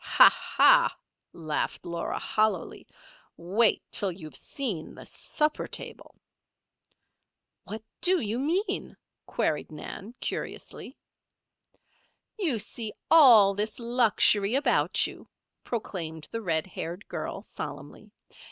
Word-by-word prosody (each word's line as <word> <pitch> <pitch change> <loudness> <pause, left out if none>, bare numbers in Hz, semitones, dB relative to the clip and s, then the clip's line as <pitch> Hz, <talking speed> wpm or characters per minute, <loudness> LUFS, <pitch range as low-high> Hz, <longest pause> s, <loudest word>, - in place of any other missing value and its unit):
"Ha! - - +7 0.3
ha!" - - +6 0.3
laughed 155 -2 -3
Laura, 170 0 -3
hollowly. 215 -5 -1 0.5
"Wait 205 +6 +2
till 200 -2 +1
you 170 -2 -10
have 155 - -10
seen 215 - -3
the - - -11
supper 300 0 -1
table." - - -7 1.5
"What 220 +1 -7 0.2
do 365 0 +5
you 225 -1 -2
mean?" 370 +8 -1 0.3
queried 150 0 -1
Nan, 195 +9 -8
curiously. - - -6 1.4
"You 320 - +1
see 220 0 -4 0.2
all 235 -11 +8
this 210 +2 -2
luxury 235 -3 +3
about 280 - +2
you," - - -9 0.3
proclaimed 165 -9 -4
the 230 - -4
red 165 -6 0
haired 180 +1 -7
girl, - - -5
solemnly. - - -8
215 Hz, 105 wpm, -27 LUFS, 175-250 Hz, 1.5 s, all